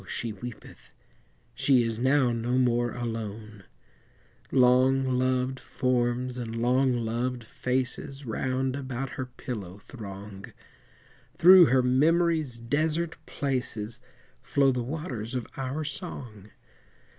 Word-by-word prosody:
she 115 +3 -3
weepeth, 110 - -11 0.6
She 130 -4 +3
is 115 -1 -2
now 130 0 +3
no 120 +2 -1
more 120 -1 +2
alone; 110 -3 -6 0.9
Long 130 +1 +4
loved 130 0 0
forms 125 0 -1
and 115 -2 -5
long 125 +3 +2
loved 120 +2 -2
faces 130 +4 -3
Round 130 +3 -1
about 135 -1 -4
her 130 -2 -5
pillow 110 -7 -7
throng, 100 -2 -10 0.8
Through 180 -1 +9
her 130 0 +3
memory's 155 +1 +2
desert 155 +7 0
places 120 -5 -2 0.4
Flow 135 +1 +2
the 125 -1 -1
waters 130 -4 -5
of 125 -3 -2
our 135 +3 -3
song. 125 - -7
125 Hz, 110 wpm, -27 LUFS, 115-135 Hz, 0.9 s, Through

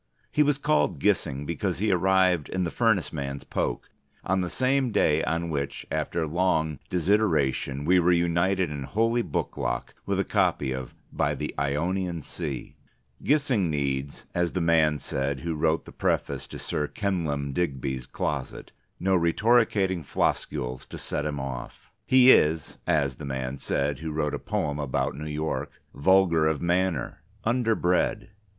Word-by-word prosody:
He 150 - +2
was 145 -1 +3
called 150 +2 +1
Gissing 75 -9 0
because 85 +3 -2
he 105 +3 +1
arrived, 95 -3 +3
in 95 0 -1
the 85 - -2
furnace 110 -9 +1
man's 70 -2 -4
poke, - - -3 0.3
on 95 0 +1
the 90 - -2
same 130 +2 +1
day 105 - +3
on 85 +1 -1
which, 70 -2 -3
after 80 +2 -1
long 80 -3 0
desideration, 80 -8 +1
we 90 +3 +5
were 90 +1 +3
united 85 +1 +2
in 75 -1 -5
holy 115 - +1
booklock - - -3
with - - 0
a - - +3
copy 70 -2 +1
of 65 -1 -5 0.2
"By - - 0
the - - -4
Ionian 85 +4 -1
Sea." 75 -6 -5 0.5
Gissing 135 - +2
needs 70 -2 -2
(as 85 -1 0
the 95 - 0
man 80 -3 +3
said 70 -1 -2
who 85 0 -2
wrote 80 +1 +1
the - - -11
preface - - -1
to - - -8
Sir 75 -1 -2
Kenelm 80 -9 -2
Digby's 65 -5 -2
Closet) - - -4 0.3
no 95 +1 +2
Rhetoricating 95 0 +2
Floscules 65 -2 -2
to - - -7
set 75 +1 -3
him 75 -2 -3
off. 65 -2 -7 0.2
He 130 0 +7
is 80 - +3
(as 70 -4 +1
the 75 - -7
man 65 0 -4
said 70 0 -1
who 80 0 -4
wrote 75 -1 -1
a - - -2
poem 75 0 -2
about 70 0 -1
New 75 +2 -6
York) 75 -2 -2 0.2
vulgar 85 0 +4
of 80 -2 0
manner, 85 -4 0 0.2
underbred. 110 -7 +1
80 Hz, 155 wpm, -26 LUFS, 70-95 Hz, 0.5 s, He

